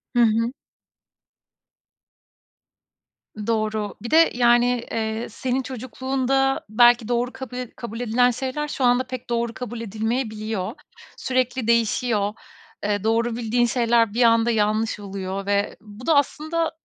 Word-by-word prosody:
Hı - - +3
hı. 230 +2 +2 2.9
Doğru. 215 -2 -1
Bir 235 - -6
de, 325 +1 +6
yani, 240 0 +3
eee, 220 +1 -2
senin 260 +1 -2
çocukluğunda 265 +2 -1
belki 240 +1 +5
doğru 245 +1 0
kabul 260 -2 -7
ed 250 -2 -5
kabul 230 -1 -7
edilen 245 +1 +3
şeyler 265 +4 -3
şu 280 - -3
anda 245 +1 +4
pek 255 -1 -7
doğru 235 -1 -1
kabul 240 -1 -6
edilmeyebiliyor. 220 -2 -3 0.4
Sürekli 255 -2 -1
değişiyor, 225 -2 +1 0.5
eee, 205 -1 -1
doğru 225 +1 +1
bildiğin 240 +1 +1
şeyler 235 -3 +2
bir 240 +2 +3
anda 230 0 +4
yanlış 215 0 0
oluyor 195 -1 -5
ve 200 0 0
bu 210 +3 -12
da 325 - +3
aslında, 315 +3 0
235 Hz, 130 wpm, -23 LUFS, 220-250 Hz, 2.9 s, de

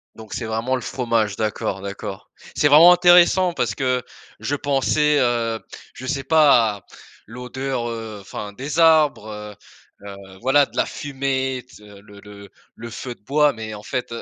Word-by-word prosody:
Donc 110 -1 -11
c'est 115 - -4
vraiment 115 +4 -1
le 125 - -4
fromage, 115 -5 -1
d'accord, 105 -2 -3
d'accord. 100 -1 -7 0.3
C'est 145 - +3
vraiment 160 +5 +8
intéressant 175 0 +5
parce 115 -9 -1
que 125 0 -1 0.4
je 145 - -2
pensais 145 +2 +1
heu, 115 -3 0 0.4
je 130 - -9
sais 135 0 -2
pas 135 -8 +4
à - - -18 0.4
l'odeur, 125 +1 -5
heu, 115 -3 -7
enfin 100 +1 -8
des 140 +7 -6
arbres, 110 -11 +2 0.5
heu, 100 -1 -8 0.3
voilà, 140 +3 +3
de - - -15
la - - +2
fumée, 135 -2 -3
le 100 0 -15
le 100 -1 -13 0.3
le 120 +1 -9
feu 120 +3 -7
de - - -35
bois, 150 +3 +2
mais 110 -1 -7
en 105 - -9
fait, 125 -3 -4
125 Hz, 160 wpm, -21 LUFS, 110-140 Hz, 0.5 s, vraiment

